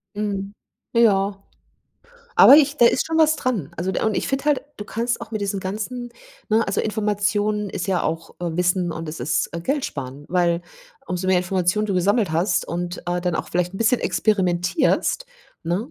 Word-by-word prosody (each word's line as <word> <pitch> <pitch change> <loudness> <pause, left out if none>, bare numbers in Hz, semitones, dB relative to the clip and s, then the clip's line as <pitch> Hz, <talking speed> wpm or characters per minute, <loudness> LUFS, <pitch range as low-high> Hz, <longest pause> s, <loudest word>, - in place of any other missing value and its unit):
Mhm. 200 -1 -3 0.4
Ja. 200 -4 +3 1.0
Aber - - +9
ich 295 0 +4
da 240 - +6
ist - - +3
schon 325 0 -1
was 315 -1 +5
dran. 225 - -2
Also 180 +3 -1
de - - -1
und 220 -2 +1
ich - - -1
finde 270 +1 -2
halt, 295 -2 +2 0.2
du 205 - -6
kannst 235 +2 -2
auch 230 - -8
mit 215 -2 -3
diesen 200 -1 -2
ganzen 220 +6 -5 0.4
ne, 220 +1 +3
also 195 - 0
Informationen 210 -1 0
ist 190 0 -4
ja 185 -3 +1
auch, 165 +1 -3
äh, 170 -2 -3
Wissen 180 0 +1
und 165 0 -6
es 155 - -7
ist, 130 +6 0
äh, 170 - -4
Geldsparen. 145 - -3
Weil 175 -1 +1 0.5
umso 180 +1 -3
mehr 185 -1 +4
Informationen 185 +3 0
du 200 - -1
gesammelt 195 +1 +2
hast 175 +2 +1
und, 175 +1 -3
äh, 175 0 -1
dann 175 -2 -1
auch - - -4
vielleicht 180 +1 -1
'n - - -6
bisschen 230 +3 +2
experimentierst, 185 - +1 0.4
ne, 180 +8 -2
195 Hz, 190 wpm, -22 LUFS, 175-220 Hz, 1.0 s, Aber